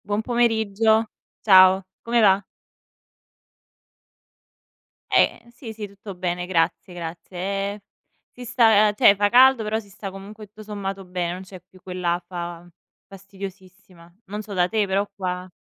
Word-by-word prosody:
Buon 205 +1 -1
pomeriggio, 220 -2 +1 0.3
ciao. 190 -1 +6 0.2
Come 235 +1 0
va? 200 -1 +4 2.7
Ehm, 235 +1 +2
sì, 235 -1 -10
sì 210 -1 -7
tutto 200 0 -10
bene 180 0 -3
grazie, 180 0 -1
grazie. 175 +1 -8 0.4
E 205 - -12 0.5
si 245 - -11
sta 220 -3 +4
cioè 200 - +6
fa 205 0 +3
caldo 255 +2 +6
però 215 +1 -1
si 205 -2 -14
sta 195 +1 -8
comunque 200 +3 -11
tutto 215 +2 -14
sommato 195 -2 -5
bene, 180 -1 -3
non 180 - -7
c'è 185 0 -12
più 185 0 -22
quell'afa 175 -1 -4 0.4
fastidiosissima. 190 -3 -12
Non 210 +2 -5
so 210 -1 -9
da 180 -1 +1
te 215 -1 0
però 195 +1 0
qua 185 -1 -5
195 Hz, 140 wpm, -23 LUFS, 180-215 Hz, 2.7 s, ciao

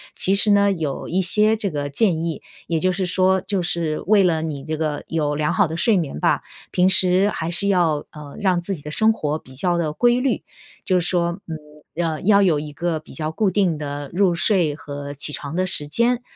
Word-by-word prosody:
其 195 - +2
实 205 +1 +5
呢， 200 0 +4
有 155 -7 -3
一 185 +2 0
些 210 +4 +3
这 210 -2 -3
个 145 -3 -4
建 170 +3 +1
议， 165 -2 -3 0.3
也 165 -1 0
就 185 +3 +1
是 185 +1 -2
说 185 +1 +2
就 195 0 -2
是 165 -3 -2
为 205 -1 +5
了 165 -3 +1
你 145 -4 -5
这 155 0 -3
个 150 -2 -2
有 150 -3 -1
良 150 0 0
好 200 -3 +3
的 160 +1 -5
睡 225 +4 +3
眠 155 - -3
吧， - - +1 0.3
平 180 +1 +3
时 190 +1 +4
还 165 -5 -4
是 190 +4 +1
要， 170 -6 +1
嗯， 145 -2 -10
让 185 -3 +1
自 195 +3 -3
己 150 - -12
的 150 - -8
生 220 +7 +3
活 155 -6 -3
比 130 -3 -16
较 175 +5 0
的 160 -3 -1
规 240 +7 +2
律。 260 0 -1 0.4
就 185 -1 +2
是 175 - +1
说， 175 0 0
嗯， 160 -1 -5 0.5
呃， 160 -2 -2
要 200 +1 +4
有 170 -7 +3
一 150 0 -7
个 165 +1 -2
比 155 - -15
较 155 -1 -3
固 200 +5 +1
定 185 -4 +1
的 145 -1 -6
入 180 -1 +2
睡 170 -4 +2
和 145 -2 -7
起 145 +1 0
床 145 +1 -6
的 185 +1 +1
时 150 -5 -1
间。 235 +9 +1
170 Hz, 245 characters per minute, -21 LUFS, 150-190 Hz, 0.5 s, 实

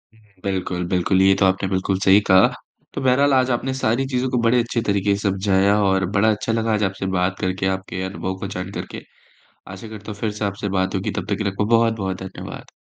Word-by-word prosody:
हुँ, - - -23 0.2
बिल्कुल, 95 -2 -2
बिल्कुल 95 +1 +1
ये 95 0 +6
तो 95 - +4
आपने 95 0 +1
बिल्कुल 95 0 0
सही 95 +1 +5
कहा। 95 0 +7 0.5
तो - - -4
बहरहाल 135 +2 +3
आज 130 -1 +3
आपने 130 +2 -1
सारी 130 0 0
चीज़ों 130 -1 -1
को 125 - 0
बड़े 120 +2 +3
अच्छे 115 0 -2
तरीके 100 0 +2
से 100 0 -1
समझाया 100 +1 +2
और 95 -1 +2
बड़ा 105 +2 +3
अच्छा 105 +2 -2
लगा 115 -1 0
आज 105 - +1
आपसे 95 0 -2
बात 90 +1 0
करके 95 +1 -2
आपके 95 -1 -7
अनुभव 95 0 -4
को 100 - -4
जान 90 0 -5
करके। - - -6 0.7
आशा 95 +4 -9
करता 105 0 -8
हूँ 105 - -11
फ़िर 110 - -1
से 105 0 -4
आपसे 100 +1 -3
बात 95 0 -1
होगी। 95 0 -1
तब 100 -3 -3
तक 100 - +1
के 110 - -2
लिए 100 - +1
आपका 100 +2 -1
बहुत-बहुत 110 -5 0
धन्यवाद। 95 0 -9
100 Hz, 230 wpm, -21 LUFS, 95-110 Hz, 0.7 s, कहा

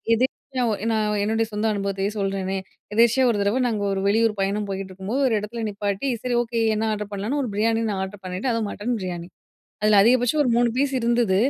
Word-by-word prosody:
எதேச்யா 255 +1 -2 0.3
நான் 210 -1 0
என்னுடைய 225 +1 +1
சொந்த 210 +2 -1
அனுபவத்தையே 195 0 -1
சொல்றனே, 195 -1 -1 0.4
எதேர்ச்சியா 235 +3 +4
1 210 - -1
தடவ 205 +6 +1
நாங்க 215 -3 -1
1 195 - -1
வெளியூர் 215 0 +2
பயணம் 200 +1 -1
போயிட்டுருக்கும்போது, 195 +5 -3
1 240 - +1
இடத்துல 225 +3 -5
நிப்பாட்டி 205 +5 -2
சரி, 250 -1 0
ஓகே, 230 -1 -2 0.2
என்ன 220 +1 0
ஆர்ட்ரு 210 -1 -3
பண்ணலான்னு 215 +9 -1
1 245 - -3
பிரியாணி 225 +2 +1
நான் 190 -1 -2
ஆர்ட்ரு 190 +1 -7
பண்ணிட்டேன். 185 +8 -2
அதுவும் 225 -3 -1
மட்டன் 235 +3 -2
பிரியாணி. 175 -1 -5 0.5
அதில 210 0 +5
அதிகபட்சம் 245 +5 +3
1 255 - 0
3 240 0 +3
பீஸ் 275 0 +1
இருந்தது 235 -4 +2
210 Hz, 190 wpm, -23 LUFS, 195-235 Hz, 0.5 s, அதில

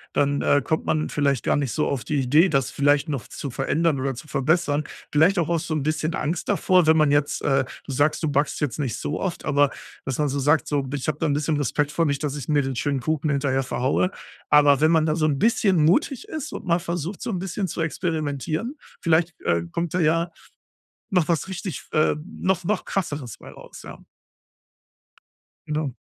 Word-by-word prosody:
dann, 140 0 +2
äh, 145 - +3
kommt 160 - -1
man 155 0 0
vielleicht 140 -4 0
gar - - +2
nicht 140 -4 -1
so 150 - 0
auf 135 -4 -2
die 150 - -1
Idee, 150 +8 +4
das 135 -5 +1
vielleicht 145 +2 +2
noch 135 -7 -3
zu 140 - -6
verändern 145 +4 0
oder 135 0 -1
zu 125 - -10
verbessern. 150 +1 +1 0.3
Vielleicht 175 +6 +4
auch 165 - 0
aus 170 -2 0
so 160 - -3
'n 155 - 0
bisschen 155 +2 -1
Angst 160 +3 -2
davor, 185 -3 +3
wenn 160 0 +6
man 150 -2 +4
jetzt, 145 0 +1
äh 135 -2 +2 0.2
du - - -6
sagst, 145 +5 +1
du 155 - +1
backst 145 +1 0
jetzt 145 -4 -2
nicht 135 -6 -2
so 150 - -3
oft, 185 -3 -3
aber 145 -1 +3 0.4
dass 135 - -2
man 150 -1 +1
so 140 +1 -2
sagt 145 +3 +2
so: 145 -2 0
„Ich 140 - -3
habe 155 -1 0
da 165 - +1
'n 145 - +1
bisschen 150 +1 0
Respekt 145 +1 0
vor, 165 +2 +1
nicht, 140 -1 -1
dass 145 -1 -2
ich 145 -4 -6
mir 150 -2 +3
den 135 0 -3
schönen 140 +2 -1
Kuchen 155 +3 -1
hinterher 135 -1 +1
verhaue.“ 130 +8 0 0.4
Aber 145 -2 +5
wenn 155 +1 +5
man 160 -2 +3
da 155 -1 +1
so 160 -2 +1
'n 150 -3 +1
bisschen 200 -7 +3
mutig 230 - +2
ist 310 -4 -5
und - - -7
mal 170 -1 +2
versucht, 170 +2 -4
so - - -4
'n 185 - -2
bisschen 190 +1 -3
zu 165 - -4
experimentieren, 160 - -2 0.3
vielleicht, 165 0 +1
äh, 85 0 +1
kommt 170 - -2
da 180 - +1
ja 165 +1 +2 0.8
noch 180 -6 +2
was 170 +1 0
richtig, 190 -1 -5
ähm 155 0 +1 0.2
noch 185 -1 +1
noch 210 +5 -1
krasseres 145 - -3
bei - - -12
raus, - - -13
ja. - - -11 1.6
Genau. 150 -3 -2
150 Hz, 215 wpm, -24 LUFS, 140-165 Hz, 1.6 s, wenn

